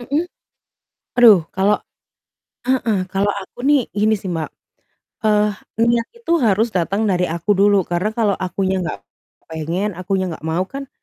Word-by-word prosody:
Mhm? 285 +7 -1 0.9
Waduh, 225 -7 +7
kalau 200 +2 +3 0.9
heeh, 245 -5 +1
kalau 200 +1 +1
aku - - -17
nih 290 -2 +5
gini 215 +1 +2
sih, 190 -2 -6
Mbak. 160 -2 -3 0.8
Eee, 210 0 +3 0.3
niat 235 -1 +1
itu 460 -8 -3
harus 220 0 +3
datang 195 +4 0
dari 180 -1 +1
aku 170 +5 -3
dulu, 200 -1 +3
karena 175 +4 -1
kalau 210 -4 +2
akunya 190 0 -1
nggak 175 -1 -4 0.5
pengen, 170 +6 -2
akunya 190 +1 -1
nggak 160 - -10
mau, 165 +3 0
kan 275 +6 -8
200 Hz, 145 wpm, -19 LUFS, 185-225 Hz, 0.9 s, Waduh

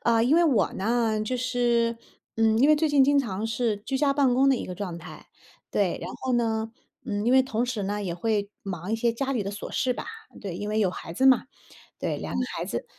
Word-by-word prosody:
呃， 230 -1 +4
因 280 +7 +4
为 345 - +5
我 250 -10 +3
呢， 220 +1 0
就 250 +4 -2
是 240 -2 +1 0.4
嗯， 225 0 +3
因 275 +5 +5
为 305 - +6
最 315 +1 +2
近 285 -2 +5
经 285 +1 +4
常 220 -5 -2
是 225 -2 -1
居 230 +6 -3
家 280 0 +2
办 275 -3 +3
公 270 +2 +4
的 270 - +4
一 - - -5
个 180 - -6
状 180 -3 -5
态。 160 -2 -11 0.4
对。 - - 0
然 - - -5
后 260 - -1
呢， 225 -2 0 0.4
嗯， 205 0 -2
因 240 - +3
为 260 0 +6
同 240 -2 -1
时 245 -4 -3
呢 205 +1 -2
也 180 -4 -3
会 205 +2 -1
忙 185 +1 -5
一 - - +2
些 235 +1 +1
家 275 +4 -2
里 240 -5 0
的 200 - -4
琐 205 +1 -7
事 255 - 0
吧， - - -6 0.4
对 195 -5 -5
因 205 +3 -4
为 215 +1 0
有 195 -4 +2
孩 165 - -8
子 260 - 0
嘛。 260 -2 +6 0.5
对， - - -2
2 - - -5
个 - - +1
孩 - - -2
子。 - - -3
230 Hz, 260 characters per minute, -26 LUFS, 205-255 Hz, 0.5 s, 为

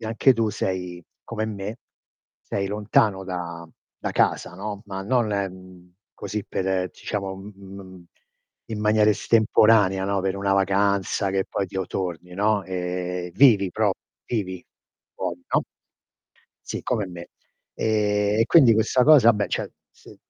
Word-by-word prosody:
anche 115 +4 +3
tu 115 -2 0
sei 90 -4 -4 0.2
come 110 -2 -4
me, 105 0 -5 0.7
sei 100 0 -3
lontano 100 -1 +1
da 85 -2 -6 0.3
da - - -3
casa, - - +1
no. 100 +1 -6
Ma 95 -1 -5
non, 120 +3 +1
mhmm, 95 -3 -5 0.2
così 105 +1 -5
per 95 -1 -1
diciamo 100 -2 -4 0.2
in 100 0 -12
m 95 -2 -12 0.7
m 105 - -5
maniera 105 0 +4
estemporanea, 105 -2 +3
no, 100 0 0
per 95 0 -1
una 100 0 0
vacanza 100 0 +1
che 95 0 0
poi 100 - -2
ti 95 - -9
torni, 90 -2 -4
no. 105 +1 +1
Ehm, 90 -1 -4
vivi 105 -8 +5
pro 110 0 +1 0.3
vivi 95 -6 -4 0.5
fuori, 90 0 -5
no? - - +3 1.0
Sì, - - -4
come 110 -5 -1
me. 85 -1 -10 0.5
Ehm, 105 -1 +1
e - - +5
quindi 135 -8 +6
questa 115 +3 +2
cosa 145 -6 +7
ah - - +8
beh, 105 -1 -1
cioè - - -3 0.2
se - - -17
100 Hz, 145 wpm, -24 LUFS, 95-105 Hz, 1.0 s, ah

